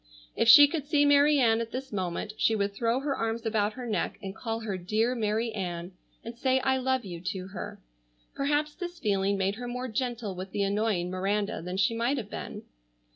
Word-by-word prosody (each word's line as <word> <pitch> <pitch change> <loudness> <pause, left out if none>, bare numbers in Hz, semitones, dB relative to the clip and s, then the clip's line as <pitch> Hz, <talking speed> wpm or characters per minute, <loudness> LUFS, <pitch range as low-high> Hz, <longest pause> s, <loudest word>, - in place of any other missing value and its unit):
If - - +1
she 290 +3 +11
could 290 -1 -4
see 290 -1 +3
Mary 285 +1 +5
Ann 230 -3 +3
at 230 - -4
this 265 -1 -6
moment 190 +2 -3
she 225 - +2
would 200 -1 -1
throw 230 +4 0
her 280 -1 -1
arms 225 +1 -2
about 215 -1 +1
her 250 +1 -7
neck 220 -3 -2
and 195 -1 -7
call 225 0 -4
her 210 -3 -3
"Dear 215 +7 0
Mary 225 0 -1
Ann," 175 -4 -4 0.3
and 230 +1 -7
say, 260 +2 +2
"I 265 0 +2
love 260 -2 0
you," 175 -3 -7
to 190 0 -4
her. 190 - -7 0.5
Perhaps 295 +2 0
this 355 0 -6
feeling 200 -5 +1
made 195 +2 0
her 245 +1 -5
more 250 +1 -4
gentle 240 -3 -3
with 185 +1 -7
the 200 - 0
annoying 200 -3 0
Miranda 200 +2 -1
than 180 +2 -5
she 195 +4 +2
might 240 +5 0
have 215 -5 -5
been. - - -6
225 Hz, 210 wpm, -28 LUFS, 200-255 Hz, 0.5 s, she